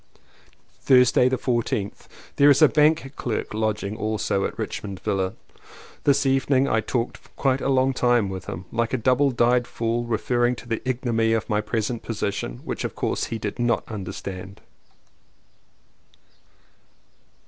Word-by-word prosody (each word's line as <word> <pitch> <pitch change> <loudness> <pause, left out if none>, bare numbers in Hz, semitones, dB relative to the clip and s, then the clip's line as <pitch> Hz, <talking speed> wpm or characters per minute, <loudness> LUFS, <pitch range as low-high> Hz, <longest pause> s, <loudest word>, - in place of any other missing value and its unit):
Thursday 125 -1 +5
the 130 - 0
14th. 115 -5 -2 0.3
There 140 +1 +6
is 145 +2 +5
a - - +9
bank 150 -1 +2
clerk 115 -3 -3
lodging 105 -1 -1
also 110 -2 -1
at - - -5
Richmond 100 -3 -5
Villa. 95 -1 -1 0.7
This 140 0 +3
evening 135 0 +2
I 110 -4 +2
talked 120 +1 -2 0.2
quite 135 -1 +1
a - - -1
long 130 0 +3
time 120 -4 +2
with 95 -1 -6
him; 90 +4 -6
like 115 +1 -1
a - - +2
double 130 +4 +3
dyed 120 0 +2
fool 115 +1 -2
referring 120 +2 +1
to 120 - -12
the 115 -1 -2
ignominy 115 -3 +1
of 115 - -1
my 105 0 +1
present 110 +2 -2
position, 100 - -3
which - - -4
of - - -4
course - - -1
he 115 - -4
did 105 0 -5
not 120 -1 +1
understand. 95 -1 -7
120 Hz, 150 wpm, -24 LUFS, 105-130 Hz, 0.7 s, a